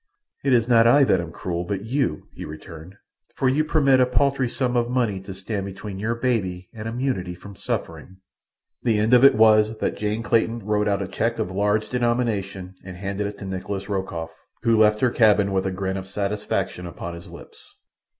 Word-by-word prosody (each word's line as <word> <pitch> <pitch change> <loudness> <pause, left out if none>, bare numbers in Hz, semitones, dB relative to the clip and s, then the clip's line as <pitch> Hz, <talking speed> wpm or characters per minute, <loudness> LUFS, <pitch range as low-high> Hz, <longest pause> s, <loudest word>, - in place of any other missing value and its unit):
"It 140 - +1
is 115 -2 +3
not 115 -2 +5
I 140 +4 +6
that 95 -9 +3
am 85 -1 -7
cruel, 85 0 -3
but 100 +3 -4
you," 135 +3 -1
he - - -8
returned, 80 +3 -10 0.4
"for 135 - +1
you 140 +4 +3
permit 140 -4 +3
a 125 - +4
paltry 135 0 +1
sum 125 0 -1
of 120 -1 +1
money 120 -6 0
to 95 +1 -9
stand 100 +1 -4
between 95 0 -7
your 110 +3 -1
baby 100 -7 -1
and 110 0 -7
immunity 115 -7 -2
from 100 +3 -12
suffering." 95 -1 -5 0.6
The 115 -3 +2
end 110 +3 +2
of 125 +1 +7
it 140 - +8
was 110 0 +5
that - - -2
Jane 105 +2 -2
Clayton 115 -1 +1
wrote 105 0 +1
out 100 -1 +1
a - - -5
cheque - - -1
of 90 - -2
large 105 +2 +1
denomination 110 -6 -1
and 90 -1 -9
handed 100 +2 -3
it 100 - -7
to - - -8
Nikolas 95 +1 -5
Rokoff, 90 -5 -3 0.3
who 115 -1 +4
left 105 0 +4
her 125 - +3
cabin 105 -4 +4
with 95 0 0
a - - -1
grin 95 0 -3
of 95 0 -6
satisfaction 100 -2 -2
upon 85 +1 -7
his 85 0 -10
lips. - - -13
105 Hz, 200 wpm, -23 LUFS, 95-120 Hz, 0.6 s, it